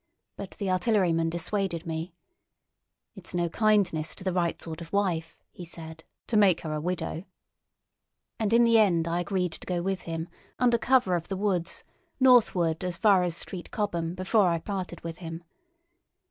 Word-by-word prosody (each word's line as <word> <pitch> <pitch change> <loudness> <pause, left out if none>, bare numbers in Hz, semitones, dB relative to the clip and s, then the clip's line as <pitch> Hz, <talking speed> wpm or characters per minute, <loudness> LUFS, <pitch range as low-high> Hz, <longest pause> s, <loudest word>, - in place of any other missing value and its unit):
But 195 -1 -8
the 200 - -3
artilleryman 180 -4 +2
dissuaded 175 0 -2
me: 165 +1 -4 1.0
"It's 185 -3 -7
no 175 -1 +1
kindness 195 -6 +1
to - - -11
the 185 -1 -1
right 175 -2 0
sort 165 0 -7
of 165 - -9
wife," 175 -5 -1
he 180 - -10
said, 160 -1 -10 0.2
"to 230 - -2
make 200 -5 +5
her 155 -2 -4
a 150 - -2
widow"; 175 0 -3 1.1
and 220 -2 0
in 235 +1 +6
the 230 -1 +5
end 170 -6 +3
I 170 +1 0
agreed 180 -1 -1
to - - -10
go 175 -1 -1
with 190 0 -1
him, 165 0 -3 0.3
under 240 -2 +3
cover 245 -9 +3
of 170 -1 -3
the 195 - -3
woods, 190 -3 -1 0.4
northward 195 -11 +4
as 180 -2 -3
far 200 -2 +5
as 175 -2 -1
Street 180 0 -6
Cobham 175 -5 -2
before 185 +2 +2
I 170 -1 +2
parted 185 -1 -5
with 165 0 -6
him. 165 -1 -7
180 Hz, 175 wpm, -27 LUFS, 165-200 Hz, 1.1 s, in